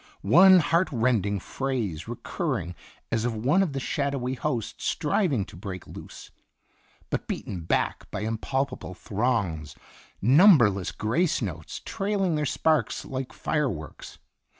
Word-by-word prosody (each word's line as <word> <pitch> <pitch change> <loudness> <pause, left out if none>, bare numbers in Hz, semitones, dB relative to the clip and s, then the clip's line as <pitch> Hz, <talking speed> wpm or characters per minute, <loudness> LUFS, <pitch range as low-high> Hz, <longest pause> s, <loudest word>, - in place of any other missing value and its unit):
One 180 - +7
heart 170 +4 +2
rending 110 -5 +1
phrase 115 - -3
recurring 90 +2 -3 0.4
as 115 -1 +1
of 120 -1 -1
one 135 - +2
of 175 -7 0
the 135 - -2
shadowy 135 -2 -2
host 125 -4 -3
striving 145 - 0
to - - -13
break 95 0 -7
loose, - - -11 0.8
but - - -2
beaten 90 - -4
back - - -1
by 95 - -4
impalpable 120 0 -2
throngs, 100 - -1 0.4
number 135 - +7
less 95 -2 -4
grace 150 +11 0
notes 85 -9 -5
trailing 195 -3 -1
their 150 -1 0
sparks 155 +3 +1
like 130 -1 -5
fire 150 -3 0
works. 75 -7 -8
125 Hz, 130 wpm, -26 LUFS, 100-150 Hz, 0.8 s, One